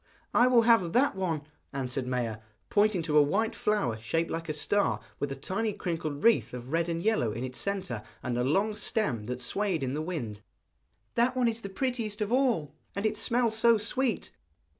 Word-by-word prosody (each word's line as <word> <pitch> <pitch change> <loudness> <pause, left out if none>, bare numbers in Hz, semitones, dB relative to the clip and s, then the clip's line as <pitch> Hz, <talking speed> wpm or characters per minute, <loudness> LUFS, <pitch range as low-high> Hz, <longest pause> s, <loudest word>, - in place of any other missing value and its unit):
'I 245 - +6
will 250 -2 +6
have 225 -8 +4
that 265 -1 +3
one,' 170 -6 -1 0.3
answered 130 -1 -2
Maia, 120 -4 -2 0.3
pointing 205 -4 +3
to 150 -2 +4
a - - +8
white 220 +10 +1
flower 130 - 0
shaped 165 +9 -1
like 165 0 -4
a - - +2
star, 200 +6 +1 0.2
with 145 - -2
a - - -3
tiny 200 +10 -2
crinkled 160 -6 -3
wreath 230 - +3
of 125 +2 -8
red 165 +1 +1
and 165 0 -2
yellow 215 - +2
in 120 +4 -4
its 125 -1 -5
centre, 185 - -2 0.2
and 125 -1 -1
a 125 - +1
long 195 +11 +1
stem 195 - -1
that 125 0 -4
swayed 180 - -1
in 130 0 -1
the 150 - -2
wind; 130 - -4 0.7
'that 245 +2 +2
one 250 -2 +3
is 230 0 -1
the 200 - -6
prettiest 230 -1 -2
of 210 0 -1
all, 245 - +2 0.2
and 200 +2 -2
it 215 - +1
smells 230 +1 +1
so 230 +1 +5
sweet.' 240 +4 -1
185 Hz, 200 wpm, -29 LUFS, 135-220 Hz, 0.7 s, a